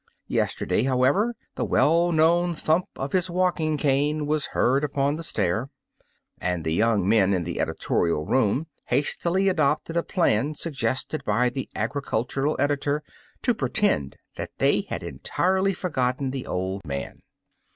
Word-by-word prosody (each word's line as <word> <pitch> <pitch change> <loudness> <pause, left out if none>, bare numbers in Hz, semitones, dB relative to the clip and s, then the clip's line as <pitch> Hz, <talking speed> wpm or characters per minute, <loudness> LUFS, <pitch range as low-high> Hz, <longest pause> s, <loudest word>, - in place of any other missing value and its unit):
Yesterday, - - 0
however, 135 - +2 0.2
the - - -2
well 170 +3 +3
known 170 +2 +3
thump 160 +3 +1
of 135 +1 -4
his 185 -1 +1
walking 170 -4 +1
cane 145 +1 +1
was 150 -1 0
heard 135 +4 +1
upon 145 0 0
the 165 - -6
stair, 110 - -1 0.7
and 90 -2 -2
the 80 - 0
young 105 0 +2
men 100 -3 +4
in 90 - -1
the 85 0 -4
editorial 85 -3 0
room 130 - +1 0.2
hastily 170 +8 +1
adopted 155 -2 +1
a 170 - +3
plan 150 - +1
suggested 135 -1 -2
by 115 +3 +2
the 130 +1 -5
agricultural 135 +3 -1
editor 145 +1 0 0.4
to 245 - +3
pretend 205 - 0 0.2
that - - -4
they - - +2
had - - -4
entirely 190 +2 0
forgotten 135 -7 -1
the 135 -1 -5
old 95 +2 -3
man. 70 -4 -5
140 Hz, 140 wpm, -25 LUFS, 115-165 Hz, 0.7 s, men